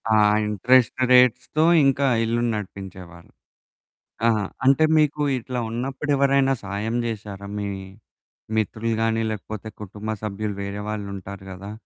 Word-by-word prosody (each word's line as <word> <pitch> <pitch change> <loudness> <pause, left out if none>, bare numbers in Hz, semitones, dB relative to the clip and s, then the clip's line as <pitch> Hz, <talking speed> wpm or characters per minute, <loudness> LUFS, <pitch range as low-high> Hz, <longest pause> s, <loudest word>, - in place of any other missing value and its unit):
ఆ! - - +5 0.3
ఇంట్రెస్ట్ 120 +5 +3
రేట్స్‌తో 125 +5 +4 0.2
ఇంకా 135 0 +3 0.2
ఇల్లుని 120 +1 0
నడిపించేవారు. 95 -4 -8 1.0
ఆహా! 110 -3 +2 0.2
అంటే, 140 +4 +5
మీకు 150 -1 +2 0.2
ఇట్లా 125 +1 -4
ఉన్నప్పుడెవరైనా 135 +2 +1
సాయం 105 +4 -3
జేశారా? 100 -3 -5
మీ 100 - -3 0.9
మిత్రులు 110 +2 -1
గానీ, 115 0 +1
లేకపోతే 110 +1 -6
కుటుంబ 105 +2 -7
సభ్యులు 105 0 -3
వేరే 100 +1 -5
వాళ్ళుంటారు 100 -2 -6
గదా! 100 +3 -8
110 Hz, 110 wpm, -23 LUFS, 100-125 Hz, 1.0 s, ఆ